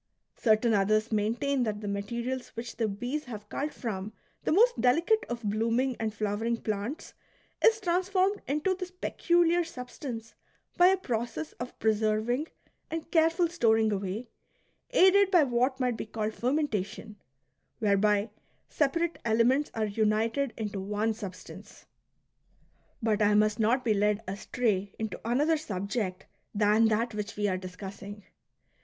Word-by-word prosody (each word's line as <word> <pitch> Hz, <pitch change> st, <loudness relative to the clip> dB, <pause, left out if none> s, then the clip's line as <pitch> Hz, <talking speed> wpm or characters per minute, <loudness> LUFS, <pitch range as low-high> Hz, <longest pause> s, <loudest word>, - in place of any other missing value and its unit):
Certain 220 Hz, 0 st, +3 dB
others 215 Hz, +2 st, +2 dB
maintain 235 Hz, +6 st, 0 dB
that 215 Hz, -3 st, -1 dB
the 205 Hz, -, -5 dB
materials 235 Hz, +5 st, -3 dB
which 235 Hz, +1 st, -6 dB
the 225 Hz, -, +1 dB
bees 245 Hz, +9 st, -3 dB
have 210 Hz, -4 st, -8 dB
culled 295 Hz, +5 st, -3 dB
from 210 Hz, -3 st, -5 dB, 0.3 s
the -, -, +1 dB
most 470 Hz, +9 st, +4 dB
delicate 335 Hz, -, +3 dB
of 240 Hz, -1 st, -4 dB
blooming 230 Hz, +5 st, 0 dB
and 220 Hz, -1 st, -1 dB
flowering 215 Hz, +2 st, -1 dB
plants 215 Hz, +7 st, -4 dB, 0.5 s
is 450 Hz, -1 st, +5 dB
transformed 375 Hz, +1 st, +1 dB
into 300 Hz, +7 st, +1 dB
this 365 Hz, -1 st, -5 dB
peculiar 345 Hz, -1 st, +2 dB
substance 250 Hz, -6 st, -7 dB, 0.4 s
by 355 Hz, 0 st, +6 dB
a 380 Hz, +1 st, +4 dB
process 230 Hz, -, -3 dB
of 245 Hz, +1 st, -6 dB
preserving 220 Hz, +6 st, +1 dB, 0.4 s
and 325 Hz, 0 st, -5 dB
careful 330 Hz, +1 st, +3 dB
storing 225 Hz, -10 st, +2 dB
away, 200 Hz, +4 st, -3 dB, 0.6 s
aided 400 Hz, -4 st, +5 dB
by 355 Hz, -5 st, +5 dB
what 255 Hz, +1 st, +1 dB
might 250 Hz, -3 st, 0 dB
be -, -, -5 dB
called 215 Hz, 0 st, -3 dB
fermentation, 225 Hz, -6 st, -2 dB, 0.3 s
— 130 Hz, +1 st, -49 dB
whereby 210 Hz, 0 st, +2 dB, 0.4 s
separate 335 Hz, +4 st, 0 dB
elements 235 Hz, +6 st, +2 dB
are 220 Hz, -1 st, 0 dB
united 220 Hz, +5 st, 0 dB
into 210 Hz, -3 st, -3 dB
one 210 Hz, +3 st, -1 dB
substance. 200 Hz, -4 st, -10 dB, 1.2 s
But 215 Hz, -1 st, +1 dB
I 210 Hz, 0 st, +4 dB
must 210 Hz, +1 st, +3 dB
not 240 Hz, +4 st, +2 dB
be 220 Hz, -, +3 dB
led 210 Hz, +1 st, +1 dB
astray 200 Hz, 0 st, -1 dB
into 220 Hz, -1 st, -4 dB
another 290 Hz, +8 st, +2 dB
subject 200 Hz, -6 st, -3 dB, 0.3 s
than 210 Hz, +2 st, +4 dB
that 225 Hz, +1 st, +1 dB
which 210 Hz, 0 st, -4 dB
we 205 Hz, 0 st, +1 dB
are 185 Hz, -2 st, 0 dB
discussing. 195 Hz, +2 st, -8 dB
225 Hz, 140 wpm, -29 LUFS, 210-280 Hz, 1.2 s, by